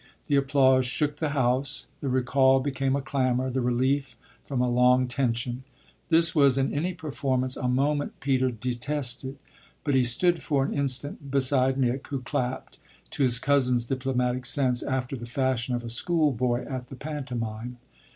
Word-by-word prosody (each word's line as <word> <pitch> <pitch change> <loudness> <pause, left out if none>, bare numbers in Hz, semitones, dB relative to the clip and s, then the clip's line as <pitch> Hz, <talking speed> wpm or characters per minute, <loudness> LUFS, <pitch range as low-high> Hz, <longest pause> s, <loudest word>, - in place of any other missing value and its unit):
The 145 - +1
applause 135 -2 +3
shook 145 +3 -1
the 155 0 -1
house 130 -1 0
the 140 - -3
recall 130 +1 +3
became 135 0 -1
a 140 - -2
clamour, 130 -1 0
the 130 +1 -1
relief 130 +1 0 0.3
from 135 -3 -3
a 125 - +2
long 125 +1 +3
tension. 125 0 -2 0.5
This 165 0 +6
was 140 -4 +4
in 135 0 0
any 170 +5 -2
performance 130 -4 -1
a 125 - -3
moment 145 +3 0
Peter 130 -2 +1
detested, 125 +3 -2 0.5
but 145 - 0
he 130 -1 +4
stood 170 +8 +1
for 140 -3 0
an - - -3
instant 140 +1 -2
beside 135 -1 +3
Nick, 130 0 -1
who 135 -2 -4
clapped, 125 +1 -4 0.3
to - - -4
his 125 -2 +4
cousin's 125 -3 +2
diplomatic 125 -1 -1
sense, 125 -3 +1
after 130 0 -2
the 120 -2 -8
fashion 130 -1 -1
of 120 - -4
a 120 - -6
school 155 +4 +1
boy 125 0 -1
at 130 -2 -5
the 135 - -10
pantomime. 125 -5 -5
130 Hz, 165 wpm, -26 LUFS, 125-140 Hz, 0.5 s, This